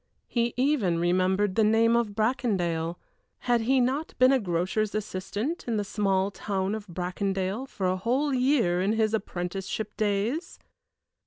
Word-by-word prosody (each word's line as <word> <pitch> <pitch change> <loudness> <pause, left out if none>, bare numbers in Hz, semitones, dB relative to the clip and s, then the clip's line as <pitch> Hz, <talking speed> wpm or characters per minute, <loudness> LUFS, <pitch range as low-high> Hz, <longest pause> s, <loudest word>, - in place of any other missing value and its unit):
He 235 -1 -1
even 250 - +2
remembered 185 +3 +2
the 220 - +3
name 225 +2 +4
of 225 -4 0
Bracondale 190 -8 0 0.4
had 240 -2 +2
he 260 +4 +2
not 265 +6 -1
been 255 0 +6
a 270 - +4
grocer's 190 +2 -1
assistant 215 - -3
in 230 -2 0
the 205 - 0
small 195 -1 0
town 195 0 -2
of 215 -1 -5
Bracondale 190 +5 -2
for 195 -7 -4
a 185 +1 +1
whole 260 +8 0
year 250 -9 +2
in 200 +3 +1
his 220 -1 +1
apprenticeship 195 0 -3
days? 215 - -1
210 Hz, 150 wpm, -27 LUFS, 190-240 Hz, 0.4 s, been